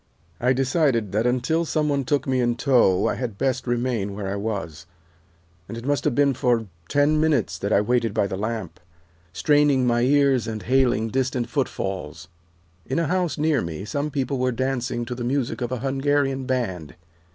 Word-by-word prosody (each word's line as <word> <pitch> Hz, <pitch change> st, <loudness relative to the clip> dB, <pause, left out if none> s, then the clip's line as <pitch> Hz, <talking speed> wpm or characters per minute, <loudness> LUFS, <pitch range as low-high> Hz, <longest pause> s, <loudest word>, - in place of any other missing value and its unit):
"I 125 Hz, +2 st, +2 dB
decided 130 Hz, -, +1 dB
that 110 Hz, +4 st, +1 dB
until 130 Hz, +7 st, +1 dB
some 155 Hz, -2 st, 0 dB
one 140 Hz, -2 st, 0 dB
took 140 Hz, 0 st, 0 dB
me 130 Hz, -1 st, +1 dB
in 120 Hz, -1 st, +1 dB
tow 120 Hz, -8 st, +3 dB
I -, -, +1 dB
had 115 Hz, -6 st, -4 dB
best 130 Hz, 0 st, -1 dB
remain 120 Hz, -5 st, -1 dB
where 100 Hz, -1 st, -4 dB
I 95 Hz, -, -2 dB
was, 100 Hz, -7 st, -4 dB, 0.8 s
and 115 Hz, -, -7 dB
it 115 Hz, -, -8 dB
must 145 Hz, 0 st, 0 dB
have 145 Hz, -5 st, +1 dB
been 140 Hz, -1 st, +3 dB
for 120 Hz, -2 st, +1 dB, 0.2 s
ten 145 Hz, +2 st, +3 dB
minutes 130 Hz, -, +1 dB
that 100 Hz, -, -2 dB
I 100 Hz, -, +4 dB
waited 115 Hz, +1 st, +1 dB
by 105 Hz, -1 st, +1 dB
the 95 Hz, -, -3 dB
lamp, 110 Hz, 0 st, -4 dB, 0.5 s
straining 145 Hz, -, +3 dB
my 120 Hz, -1 st, +2 dB
ears 135 Hz, -2 st, +3 dB
and 110 Hz, -2 st, -5 dB
hailing 125 Hz, -3 st, +2 dB
distant 130 Hz, -1 st, -1 dB
footfalls. 95 Hz, -, -3 dB, 0.5 s
In 75 Hz, -, -3 dB
a 165 Hz, -, +1 dB
house 180 Hz, +1 st, 0 dB
near 150 Hz, -4 st, +2 dB
me 85 Hz, +3 st, -5 dB
some 145 Hz, +6 st, -2 dB
people 135 Hz, -2 st, -2 dB
were 130 Hz, 0 st, +1 dB
dancing 125 Hz, -1 st, -2 dB
to 125 Hz, -, -5 dB
the 120 Hz, 0 st, -5 dB
music 130 Hz, 0 st, -1 dB
of 120 Hz, 0 st, -2 dB
a 125 Hz, -2 st, -3 dB
Hungarian 135 Hz, 0 st, 0 dB
band. 95 Hz, -, -2 dB
125 Hz, 185 wpm, -23 LUFS, 110-140 Hz, 0.8 s, I